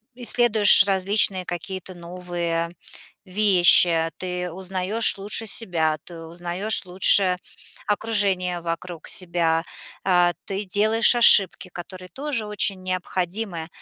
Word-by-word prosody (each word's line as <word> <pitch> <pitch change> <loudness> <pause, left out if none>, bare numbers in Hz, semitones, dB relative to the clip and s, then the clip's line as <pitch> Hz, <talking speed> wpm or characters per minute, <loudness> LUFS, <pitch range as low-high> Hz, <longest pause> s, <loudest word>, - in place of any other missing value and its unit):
исследуешь 235 -4 +5
различные 195 -1 0
какие-то 185 +2 -8
новые 170 -1 -6 0.5
вещи, 180 -4 +2
ты 180 -1 -6
узнаёшь 190 +4 0
лучше 210 +3 -2
себя, 165 -8 -1
ты 170 -2 -13
узнаёшь 175 +6 +1
лучше 185 0 +4 0.5
окружение 200 -5 -2
вокруг 170 0 -8
себя, 170 -2 -2 0.4
а, 175 -2 +1
ты 195 +1 -6
делаешь 215 +5 +2
ошибки, 195 -5 +4
которые 185 +1 -12
тоже 265 - -6
очень 200 -2 -4
необходимы, 185 -1 -6
185 Hz, 100 wpm, -20 LUFS, 175-205 Hz, 0.5 s, исследуешь